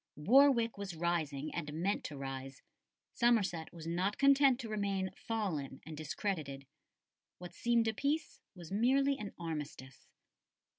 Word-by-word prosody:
Warwick 235 Hz, -, +4 dB
was 195 Hz, -4 st, -5 dB
rising, 155 Hz, -4 st, -1 dB
and 150 Hz, -4 st, -4 dB
meant 180 Hz, +6 st, -1 dB
to 145 Hz, -, -6 dB
rise; 135 Hz, -1 st, -6 dB, 0.5 s
Somerset 200 Hz, -9 st, +2 dB
was 165 Hz, -2 st, -10 dB
not 180 Hz, +5 st, -1 dB
content 275 Hz, -2 st, +5 dB
to 235 Hz, -, -6 dB
remain 200 Hz, -3 st, -1 dB
fallen 170 Hz, -12 st, -3 dB
and 160 Hz, -, -7 dB
discredited. 150 Hz, -3 st, -3 dB, 0.7 s
What 180 Hz, 0 st, -9 dB
seemed 235 Hz, -1 st, +2 dB
a 220 Hz, -, +1 dB
peace 290 Hz, +7 st, -2 dB
was 175 Hz, -2 st, -11 dB
merely 270 Hz, +6 st, +3 dB
an 205 Hz, -1 st, -5 dB
armistice. 150 Hz, -5 st, -6 dB
185 Hz, 135 wpm, -34 LUFS, 155-230 Hz, 0.7 s, content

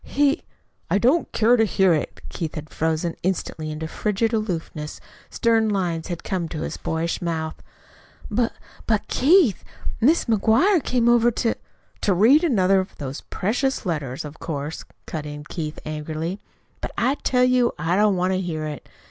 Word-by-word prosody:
He 285 Hz, 0 st, +2 dB, 0.2 s
" -, -, -45 dB
"I -, -, +3 dB
don't 260 Hz, -, +2 dB
care 230 Hz, +2 st, +4 dB
to 225 Hz, -, +4 dB
hear 190 Hz, -4 st, +3 dB
it." 155 Hz, -, -2 dB
Keith 165 Hz, -2 st, -5 dB
had 155 Hz, -1 st, -7 dB
frozen 160 Hz, +1 st, -1 dB
instantly 165 Hz, -4 st, -2 dB
into 155 Hz, +1 st, -4 dB
frigid 215 Hz, +6 st, -1 dB
aloofness. 170 Hz, -8 st, -3 dB, 0.3 s
Stern 225 Hz, -2 st, +2 dB
lines 175 Hz, -5 st, -1 dB
had 175 Hz, -2 st, -5 dB
come 180 Hz, -4 st, -2 dB
to 155 Hz, -, -5 dB
his -, -, -3 dB
boyish 165 Hz, +1 st, -2 dB
mouth. 160 Hz, -2 st, -3 dB, 0.7 s
"But 240 Hz, -2 st, +1 dB, 0.4 s
but, 215 Hz, -3 st, +1 dB
Keith, 290 Hz, -, +4 dB, 0.4 s
Mrs. 310 Hz, +9 st, +4 dB
McGuire 235 Hz, -, +3 dB
came 245 Hz, -2 st, +1 dB
over 240 Hz, 0 st, +5 dB
to 230 Hz, 0 st, 0 dB, 0.3 s
" -, -, -36 dB
"To 200 Hz, -, +3 dB
read 245 Hz, -, +6 dB
another 195 Hz, -, +4 dB
of 185 Hz, -, -5 dB
those 140 Hz, -1 st, -5 dB
precious 245 Hz, +6 st, -1 dB
letters, 145 Hz, -6 st, -3 dB
of 150 Hz, +2 st, -9 dB
course," 150 Hz, -1 st, -4 dB, 0.2 s
cut 155 Hz, -2 st, -5 dB
in 150 Hz, 0 st, -7 dB
Keith 155 Hz, 0 st, -5 dB
angrily, 155 Hz, +4 st, -4 dB, 0.4 s
"but -, -, -3 dB
I 255 Hz, +3 st, +2 dB
tell 250 Hz, -1 st, +2 dB
you 250 Hz, -1 st, +3 dB
I 165 Hz, +4 st, 0 dB
don't 205 Hz, 0 st, +4 dB
want 185 Hz, +1 st, +1 dB
to 185 Hz, -, 0 dB
hear 160 Hz, -4 st, -3 dB
it. 150 Hz, -3 st, -6 dB
185 Hz, 175 wpm, -23 LUFS, 160-230 Hz, 0.7 s, read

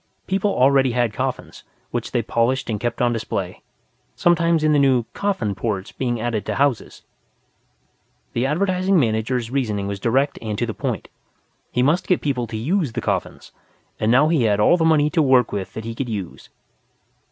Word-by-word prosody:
People 195 Hz, +2 st, 0 dB
already 135 Hz, -5 st, +3 dB
had 120 Hz, -3 st, +1 dB
coffins, -, -, -4 dB, 0.3 s
which -, -, -3 dB
they -, -, -1 dB
polished 120 Hz, +1 st, 0 dB
and 105 Hz, -, -2 dB
kept 120 Hz, +1 st, -2 dB
on 120 Hz, 0 st, +2 dB
display, 100 Hz, -5 st, -4 dB, 0.5 s
sometimes 170 Hz, -2 st, +2 dB
in 155 Hz, 0 st, +3 dB
the 145 Hz, -, +4 dB
new 130 Hz, -3 st, +3 dB
"Coffin 190 Hz, -, -1 dB
ports" 100 Hz, 0 st, -3 dB
being 120 Hz, -3 st, -2 dB
added 115 Hz, -2 st, -2 dB
to -, -, -1 dB
houses. 140 Hz, -4 st, -1 dB, 1.3 s
The 120 Hz, +3 st, 0 dB
Advertising 185 Hz, +4 st, +1 dB
Manager's 115 Hz, 0 st, -1 dB
reasoning 110 Hz, -7 st, -1 dB
was 100 Hz, 0 st, -4 dB
direct 135 Hz, +7 st, +1 dB
and 110 Hz, -2 st, -4 dB
to 120 Hz, -, 0 dB
the 110 Hz, -, -4 dB
point. -, -, -4 dB, 0.6 s
He 125 Hz, -, +1 dB
must 150 Hz, +7 st, +1 dB
get 180 Hz, -, +2 dB
people 125 Hz, -5 st, -2 dB
to 110 Hz, 0 st, -5 dB
use 150 Hz, -, -1 dB
the -, -, -2 dB
coffins; -, -, -3 dB, 0.5 s
and 110 Hz, +1 st, +1 dB
now 135 Hz, +5 st, +5 dB
he 160 Hz, -5 st, +2 dB
had 105 Hz, -1 st, +2 dB
all 105 Hz, -, +5 dB
the 170 Hz, -, 0 dB
money 150 Hz, -2 st, +3 dB
to 160 Hz, -, +2 dB
work 130 Hz, -4 st, +4 dB
with 100 Hz, -2 st, -5 dB
that 110 Hz, -, -6 dB
he 115 Hz, -, -4 dB
could 125 Hz, +1 st, -4 dB
use. 100 Hz, -5 st, -6 dB
125 Hz, 185 wpm, -21 LUFS, 110-150 Hz, 1.3 s, now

